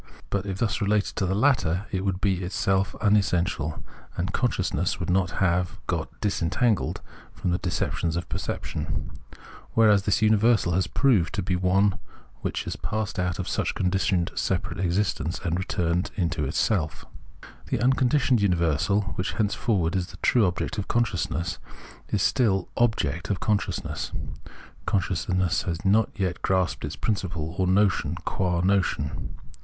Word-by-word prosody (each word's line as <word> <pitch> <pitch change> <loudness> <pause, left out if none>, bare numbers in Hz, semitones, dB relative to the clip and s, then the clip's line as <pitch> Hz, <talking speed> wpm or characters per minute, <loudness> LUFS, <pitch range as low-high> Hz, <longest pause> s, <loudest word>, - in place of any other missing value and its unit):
But 100 0 -1
if 95 -1 -3
thus 105 -1 0
related 105 0 +1
to 95 - +1
the 95 - 0
latter, 105 - +2
it 95 -1 -1
would 95 -2 -1
be 95 -2 +1
itself 95 +1 0
unessential, 90 -7 +1 0.3
and 95 +2 -2
consciousness 95 - 0
would 90 -1 -1
not 90 0 +2
have 90 -1 +1
got - - -2
disentangled 105 +2 0 0.3
from 90 - -2
the 90 - 0
deceptions 85 -2 -1
of 85 - -3
perception; 75 -1 -4 0.6
whereas 105 -3 +5
this 105 +2 +1
universal 110 -3 +4
has 90 0 +1
proved 110 - +2
to - - -1
be 90 0 0
one 95 +2 +2 0.4
which - - -3
has - - -4
passed 110 -3 -3
out 90 -1 0
of 95 - -4
such - - -1
conditioned 90 -1 +1
separate - - -2
existence 90 -3 0
and 85 +1 0
returned 90 +1 0
into 85 -6 -1
itself. 80 +2 0 0.6
This - - 0
unconditioned 130 -1 +3
universal, 90 +1 +2 0.2
which 90 - -1
henceforward 100 -5 0
is 90 -2 0
the - - -12
true 115 -6 +4
object 90 +4 -2
of 100 - -3
consciousness, 90 -6 -1 0.5
is - - +1
still 100 -8 +2
object 100 -7 0
of 100 - 0
consciousness; 105 -3 -1 0.8
consciousness 90 -1 +1
has 85 0 -3
not 105 +3 +4
yet 95 -4 -2
grasped 90 -6 0
its 75 - -5
principle, 90 -7 -2
or 95 - +2
notion, 95 -4 +2
qua 90 -2 0
notion. 90 -6 0
95 Hz, 145 wpm, -26 LUFS, 85-105 Hz, 0.8 s, whereas